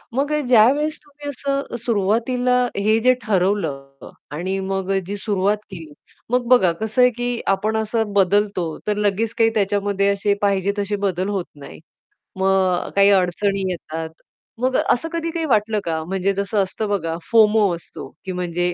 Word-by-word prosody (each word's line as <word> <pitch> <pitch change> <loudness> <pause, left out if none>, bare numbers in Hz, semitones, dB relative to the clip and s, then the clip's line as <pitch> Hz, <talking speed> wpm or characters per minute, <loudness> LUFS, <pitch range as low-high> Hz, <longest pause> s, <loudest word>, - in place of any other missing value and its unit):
मग 285 +2 0
अ, 300 - +1
ज्यावेळेस 275 +7 +4
तुम्ही 290 0 -9
असं 275 -1 -3
सुरुवातीला 240 +4 +1 0.2
हे 215 +3 +2
जे 255 +2 +4
ठरवलं 170 -10 -2 0.2
आणि 185 +5 -2
मग 195 0 -2
अ, 195 - +2
जी 205 +2 -5
सुरुवात 205 0 0
केली, 165 -5 -9 0.4
मग 245 0 0
बघा 215 -9 +5
कसं 220 +3 0
आहे, 250 - +7
की 245 0 -3
आपण 205 +3 +1
असं 220 -1 -1
बदलतो, 195 -4 +1
तर 210 - +1
लगेच 210 +2 0
काही 225 0 +4
त्याच्यामध्ये 200 -1 +1
असे 200 0 +1
पाहिजे 200 -1 +1
असे 205 +1 -2
बदल 195 -1 -1
होत 195 -4 -2
नाहीत. 145 +1 -12 0.6
मग 190 -2 +1
काही 200 0 +6
अडचणी 195 +1 +1
येतात. 160 -2 -5 0.5
मग 255 +1 0
असं 320 +7 +1
कधी 335 0 -2
काही 330 -1 -2
वाटलं 215 -5 +1
का? 160 -1 -2
म्हणजे 190 +2 -1
जसं 200 +2 -2
असतं 210 +3 -4
बघा, 165 -5 -1
फोमो 215 -3 +5
असतो, 165 -5 -10 0.2
की 190 - -3
म्हणजे 175 0 -2
205 Hz, 165 wpm, -21 LUFS, 190-230 Hz, 0.6 s, आहे